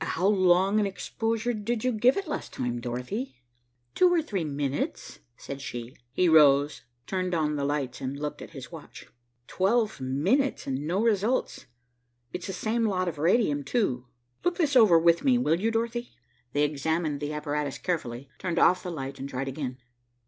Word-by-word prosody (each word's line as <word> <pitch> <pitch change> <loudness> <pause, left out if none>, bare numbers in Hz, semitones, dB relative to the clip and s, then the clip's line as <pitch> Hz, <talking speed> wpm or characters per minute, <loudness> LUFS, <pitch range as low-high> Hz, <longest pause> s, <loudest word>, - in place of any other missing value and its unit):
"How 175 +2 -1
long 190 0 +4
an 205 - +2
exposure 225 +4 -2
did 220 +1 -2
you 255 - +2
give 240 - +3
it 395 -2 -3
last 300 - -5
time, 120 -1 -3
Dorothy?" 125 - -4 0.6
"Two 365 -1 +4
or 340 -2 +2
three 200 - -2
minutes," 145 -2 -3 0.2
said 140 0 -7
she. 120 -2 -6 0.2
He 180 +8 +2
rose, 145 -2 +5 0.2
turned 185 -2 -1
on 150 -2 0
the 140 - -2
lights 140 -3 -2
and 135 +1 -3
looked 150 0 -4
at - - -8
his - - -10
watch. - - -11 0.4
"Twelve 210 - +1
minutes 180 - +1
and 135 +2 -3
no 190 +6 +1
results. 225 +2 0 0.7
It's 180 - -5
the 190 - -4
same 225 +5 -1
lot 185 -4 0
of 160 -4 -4
radium, 165 -4 +2
too. 130 - -1 0.4
Look 355 0 0
this 295 -5 +1
over 215 -9 +7
with 170 +1 +4
me, 260 -3 +4
will 165 -9 +2
you, 220 +4 +1
Dorothy?" 235 +1 -2 0.4
They 145 - +2
examined 150 +1 -1
the 150 +1 -3
apparatus 150 -2 -2
carefully, 135 -7 -3
turned 175 -2 -3
off 180 +1 +5
the 180 - -5
light 135 -4 -5
and 135 +1 -5
tried 135 0 -3
again. 130 -2 -5
170 Hz, 180 wpm, -27 LUFS, 140-220 Hz, 0.7 s, over